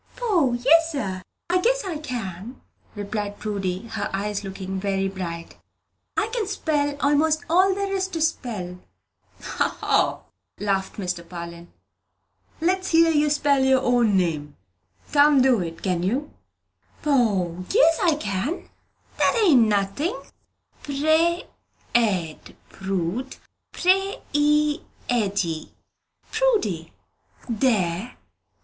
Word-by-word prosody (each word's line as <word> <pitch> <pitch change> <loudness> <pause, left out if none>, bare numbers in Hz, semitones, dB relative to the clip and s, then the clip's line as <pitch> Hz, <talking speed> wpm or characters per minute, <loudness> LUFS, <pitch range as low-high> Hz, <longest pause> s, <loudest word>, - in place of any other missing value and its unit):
"Poh! 375 - +1
yes, 320 +7 +4
sir, 190 -9 -3 0.3
I 360 +1 +2
guess - - +1
I 340 -5 -3
can," 235 - -6 0.4
replied 205 0 -4
Prudy, 195 -1 -3
her 210 -2 -3
eyes 205 +1 -2
looking 190 0 -5
very 195 0 0
bright, 170 -3 -6 0.6
"I 430 - +3
can 455 -5 -1
spell 300 -7 0 0.2
'most 310 +1 +2
all 375 +3 +4
there 395 0 -2
is 380 -1 0
to 350 -4 -5
spell." 215 - -2 0.8
"O, - - +1
ho," - - +1 0.4
laughed 195 -2 -1
Mr. 180 -3 -3
Parlin. 170 -1 -8 0.9
"Let's 370 +3 +1
hear 330 -1 +5
you 300 -1 +3
spell 285 -2 +2
your 265 -1 +4
own 240 -5 +3
name. 150 -5 -1 0.5
Can't 285 -2 +5
do 255 -4 +4
it, 165 -2 -5
can 180 -3 0
you?" 255 +11 -1 0.7
"Poh! 200 - +1
yes, 330 -8 +4
I 330 -3 +3
can! 225 - -3 0.5
That 475 - +3
ain't 285 -10 +6
nothin'. 210 - 0 0.6
Pre 315 +4 +2 0.5
ed, 190 -9 0
Prood, 195 +6 -3 0.4
Pre 385 +2 +2 0.2
i 295 0 +3 0.3
eddy, 195 -9 -1 0.6
Prudy. 215 - +1 0.6
There!" 220 -3 0
240 Hz, 115 wpm, -24 LUFS, 190-315 Hz, 0.9 s, ain't